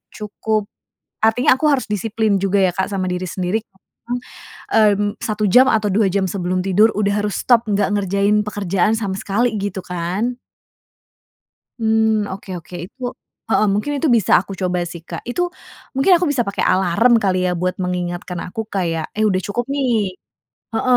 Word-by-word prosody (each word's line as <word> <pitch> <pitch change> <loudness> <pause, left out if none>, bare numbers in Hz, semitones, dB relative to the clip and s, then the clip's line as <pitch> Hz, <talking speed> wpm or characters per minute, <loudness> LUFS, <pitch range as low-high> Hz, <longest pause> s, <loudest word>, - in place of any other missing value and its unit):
Cukup, 210 0 -2 0.6
artinya 225 +4 +4
aku 305 - +1
harus 275 -3 +2
disiplin 210 0 0
juga 195 0 +1
ya, 185 -1 +3
Kak, 190 +1 -1
sama 195 -2 -2
diri 180 +1 -2
sendiri 185 +4 -1 1.1
heeh, 215 -2 +5
mmm, 205 0 -1
1 210 -1 0
jam 250 +7 +7
atau 215 -3 +2
2 205 +1 +3
jam 195 +1 0
sebelum 185 -1 -1
tidur, 205 +4 +4
udah 205 0 +1
harus 205 - -2
stop 240 -2 +4
nggak 200 -1 +1
ngerjain 200 +2 +2
pekerjaan 200 -1 0
sama 195 -4 -3
sekali, 220 +3 0
gitu 200 -1 -3
kan? 180 +8 -2 1.4
Mmm, 220 -1 +2
oke 195 0 -10
oke, 175 - -12
itu 245 +7 -21 0.5
heeh, 215 -1 +3
mungkin 210 +9 -1
itu 295 - 0
bisa 220 -6 +1
aku 195 - -8
coba 180 -1 0
sih, 170 - -9
Kak. - - -5
Itu, 245 - -1 0.5
mungkin 275 +8 +4
aku 350 +1 +1
bisa 260 -4 +1
pakai 200 - -2
alarm 190 +6 +3
kali 190 -2 +2
ya, 180 - +1
buat 185 0 0
mengingatkan 180 0 -3
aku 200 +5 -4
kayak, 165 -4 0
"Eh, 215 - +2
udah 185 -1 0
cukup, 240 +4 -2
nih" 280 -2 0 0.9
heeh. 250 +2 +3
205 Hz, 170 wpm, -19 LUFS, 185-220 Hz, 1.4 s, jam